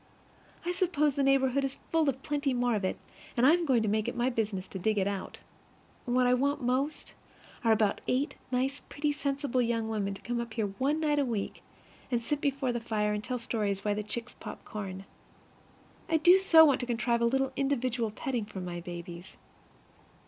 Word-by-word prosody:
I 350 - 0
suppose 340 -5 +1
the 280 - -1
neighborhood 275 0 +3
is 270 0 -2
full 320 -3 +3
of 265 0 -4
plenty 285 -3 0
more 245 -1 +1
of 205 -2 -1
it, 185 - -1 0.4
and 240 - +4
I 285 - +8
am 345 -1 +1
going 245 -5 +3
to - - 0
make 215 +2 +1
it 240 - -3
my 245 +2 +1
business 210 -5 -2
to 190 - -6
dig 215 +3 +1
it 195 - +2
out. 200 -1 -4 0.7
What 250 +1 +2
I 245 - +4
want 280 +2 +1
most 260 +5 -1 0.5
are 230 - +4
about 215 -2 +2
eight 275 +3 +1 0.2
nice, 265 +3 0
pretty, 295 0 -1
sensible 280 -3 -1
young 230 -2 0
women 200 -3 -2
to - - -12
come 240 0 -2
up 235 -1 -7
here 220 -3 0
one 290 +4 +1
night 300 -2 +2
a - - +3
week, 225 -6 -3 0.5
and 240 -2 0
sit 290 +5 -1
before 275 -2 0
the 240 - -2
fire 210 -2 0
and 210 0 -3
tell 250 +1 -2
stories 210 -4 -2
while 205 - +2
the 210 - -2
chicks 230 +3 -5
pop - - -9
corn. 195 -3 -6 1.0
I 325 - +4
do 355 +4 +7
so 325 -4 +8
want 285 -3 +3
to 245 - -3
contrive 235 0 0
a - - +4
little 270 +3 +1
individual 255 -4 0
petting 245 0 -3
for 205 -2 -8
my 175 -1 -5
babies. 175 +1 -8
245 Hz, 205 wpm, -30 LUFS, 215-280 Hz, 1.0 s, I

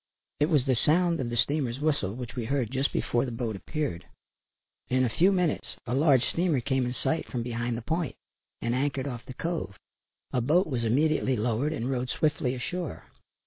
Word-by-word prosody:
It 150 +2 +3
was 145 -6 +3
the 130 -2 +3
sound 170 +6 +3
of 125 -3 -1
the 120 - -2
steamer's 130 0 +1
whistle 140 -10 0
which 125 -1 -6
we 120 -3 -2
heard 125 -2 0
just 135 +1 +1
before 120 - +1
the 130 - -3
boat 115 -2 -2
appeared. 95 - -3 0.9
In 130 +1 +3
a 125 - +2
few 185 +4 +5
minutes 180 -5 0
a 120 - -2
large 135 -2 +5
steamer 170 -5 +1
came 130 0 0
in 125 - -3
sight 160 +5 -1
from 120 -3 -3
behind 120 0 -2
the 115 - -6
point 160 0 -1 0.5
and 115 - +1
anchored 135 +1 0
off 125 -4 -5
the 130 - -8
cove. 165 - -3 0.6
A 125 - +2
boat 160 +10 +3
was 125 -6 -2
immediately 135 +3 +2
lowered 120 +6 0
and 135 -6 -2
rowed 130 -1 -1
swiftly 140 -4 +1
ashore. 170 +6 -5
130 Hz, 195 wpm, -28 LUFS, 120-155 Hz, 0.9 s, few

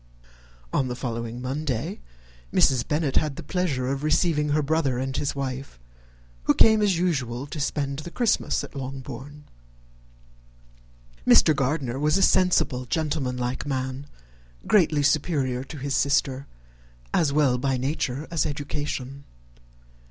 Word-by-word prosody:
On 135 - +1
the 125 - -3
following 115 -1 -4
Monday, 130 -2 -3 0.5
Mrs. 125 -3 +3
Bennet 150 -2 0
had 150 -3 +1
the - - -8
pleasure 150 -7 -1
of 135 0 -2
receiving 155 0 +2
her 150 +1 +2
brother 140 -4 +1
and 130 +1 -3
his 140 -1 -1
wife, 135 - -5 0.7
who - - +4
came, 220 -1 +6
as 200 -4 +2
usual, 135 -8 -1
to 150 +2 -7
spend 140 -1 -2
the 155 - -7
Christmas 235 +5 +1
at - - -9
Longbourn. 135 +1 -7 1.8
Mr. 155 - +6
Gardiner 135 -2 -1
was 150 +4 +2
a 195 - +2
sensible, 175 -10 +3
gentlemanlike 130 -4 -2
man, 130 0 -3 0.6
greatly 160 -7 +3
superior 140 -4 +1
to 150 - -9
his 140 0 -2
sister, 140 -1 +1 0.7
as 155 -4 +3
well 140 -4 +3
by 135 0 0
nature 135 +1 -2
as 165 -4 +1
education. 145 -2 -4
140 Hz, 130 wpm, -25 LUFS, 130-155 Hz, 1.8 s, came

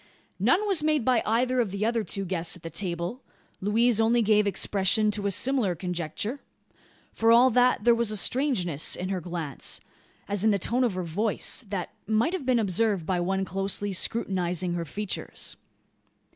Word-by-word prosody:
None 305 - +2
was 380 -6 +2
made 305 -5 +1
by 250 -3 +3
either 250 +3 +1
of 230 -4 +1
the 200 +2 -2
other 230 -1 0
two 195 -1 -3
guests 175 -2 0
at 175 - -21
the 165 - -6
table. 175 +5 -4 0.4
Louise 225 +3 +3
only 230 +1 +3
gave 210 -1 +3
expression 200 +2 +2
to 205 -1 -2
a - - 0
similar 220 -2 +1
conjecture. 180 - -3 0.7
For 225 0 +3
all 245 +2 +6
that, 250 -2 +3
there 235 +1 +6
was 235 -1 0
a 215 - -2
strangeness 195 - +1
in 185 +1 -4
her 190 -2 -2
glance 165 -5 -4 0.5
as 200 0 0
in 220 - +4
the 205 - +3
tone 240 +7 0
of 230 -7 0
her 185 - -2
voice 205 +9 -2
that 190 -4 -3 0.2
might 220 - +1
have 300 -9 -4
been 255 -2 +3
observed 205 -3 +1
by 180 +1 0
one 190 +2 -1
closely 195 +1 -2
scrutinising 180 -4 -1
her 170 -1 -3
features. 205 +6 -5
205 Hz, 180 wpm, -27 LUFS, 185-235 Hz, 0.7 s, all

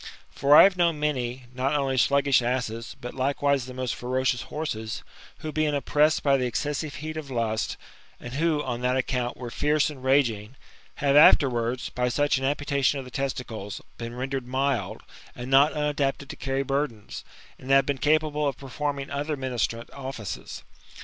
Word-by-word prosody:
For 140 +1 +4
I - - +11
have 195 - +6
knOWn 170 -2 +3
many, 130 -4 -2
not 130 +3 0
only 135 -2 0
sluggish 140 +1 +3
asses, 120 -2 -3
but 120 - -7
likewise 140 0 0
the 130 - -8
most 130 -1 -2
ferocious 125 0 -1
horses, 110 -8 -4 0.4
who, 155 - -4
being 155 -1 0
oppressed 150 +2 +2
by 140 -1 +4
the 125 -1 0
excessive 145 +3 -3
heat 155 +3 -6
of 150 -3 -6
lust, 115 -3 -1 0.4
and 120 - -8
who,, 155 0 +1
on 120 -2 -3
that 125 +1 +1
account, 125 -1 -1
were 120 -1 -7
fierce 150 +3 +1
and 135 -3 -11
raging, 125 -4 +1 0.4
have 140 -1 +1
afterwards, 125 -5 +5
by 125 0 -1
such 145 +1 +1
an 135 - -2
amputation 140 -1 +1
of 135 - -5
the 125 - -11
testicles, 120 -7 -4 0.2
been 115 0 -6
rendered 130 0 -3
mild, 135 0 -1 0.3
and 125 +2 -7
not 140 +3 +6
umtdapted 145 -2 -1
to - - -6
carry 135 0 -2
burdens, 135 -6 -3 0.4
and 130 - -10
hive 135 0 +5
been 140 -2 -2
capable 150 0 +2
of 135 - -2
perfo'rming 140 +1 -4
other 145 +1 -2
ministrant 120 -3 -2
offices. 130 -7 -7
135 Hz, 170 wpm, -26 LUFS, 125-145 Hz, 0.4 s, I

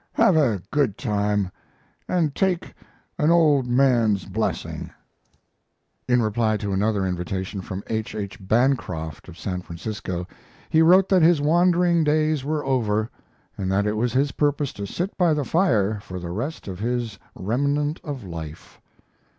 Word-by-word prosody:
Have 185 - +4
a 115 - +2
good 140 -9 +1
time 105 -3 0 0.6
and 165 -6 +1
take 185 0 -1 0.5
an 150 - +3
old 150 -6 +4
man's 120 -6 +3
blessing. 105 +3 -3 1.2
In 125 -1 +3
reply 110 0 +1
to 100 -2 -3
another 100 0 +1
invitation 95 +2 -3
from 95 +2 -6
H. 110 -1 -3
H. 100 -2 -5
Bancroft, 95 - 0
of 85 - -12
San 90 -1 -4
Francisco, 90 0 -5 0.4
he 160 - +5
wrote 185 +4 +6
that 190 -2 +4
his 165 -1 +5
wandering 170 +2 +3
days 155 -1 +1
were 150 0 -2
over, 110 -4 0 0.4
and 95 -1 -2
that 100 +1 +2
it 105 - +1
was 120 +2 0
his 135 +2 +2
purpose 145 -2 0
to 100 0 -6
sit 180 - -3
by 170 -4 +4
the 145 -2 -1
fire 110 - +2
for 95 -2 -8
the 85 -1 -6
rest 125 - -4
of 95 -2 -6
his 115 -3 -2 0.2
"remnant 145 - 0
of 140 -6 -5
life." 80 -4 -9
115 Hz, 150 wpm, -24 LUFS, 100-150 Hz, 1.2 s, wrote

